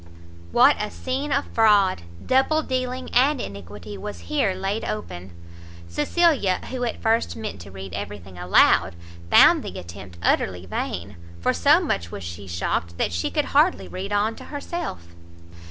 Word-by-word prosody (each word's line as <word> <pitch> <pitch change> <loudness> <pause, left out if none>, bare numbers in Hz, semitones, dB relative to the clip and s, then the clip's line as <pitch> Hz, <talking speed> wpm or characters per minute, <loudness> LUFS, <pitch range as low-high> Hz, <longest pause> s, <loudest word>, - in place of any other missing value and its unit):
What 260 +4 +6
a 210 - -2
scene 270 +5 -3
of 280 +2 +1
fraud, 205 - +4 0.2
double 270 +4 +3
dealing, 255 -1 -3
and 270 +3 +4
iniquity 100 - -8
was 95 -3 -7
here 185 - 0
laid 195 +3 -2
open! 90 -3 -5 0.6
Cecilia, 250 - +2
who 255 -1 -3
at 235 - -3
first 225 +1 +1
meant 215 - -6
to 85 - -11
read 95 -1 -9
every 100 +3 -5
thing 95 0 -14
aloud, 90 -1 +4 0.3
found - - +7
the - - -7
attempt 85 +1 -10
utterly 90 -1 +1
vain, 90 +1 -4 0.2
for 85 - +1
so 85 - +5
much 85 0 -2
was 100 - -7
she 85 +4 -7
shocked, 85 0 -2
that 85 - 0
she 85 - -1
could - - 0
hardly 95 +1 +3
read 190 - -6
on 210 +2 +1
to - - -10
herself. 285 - -5
105 Hz, 160 wpm, -24 LUFS, -, 0.6 s, found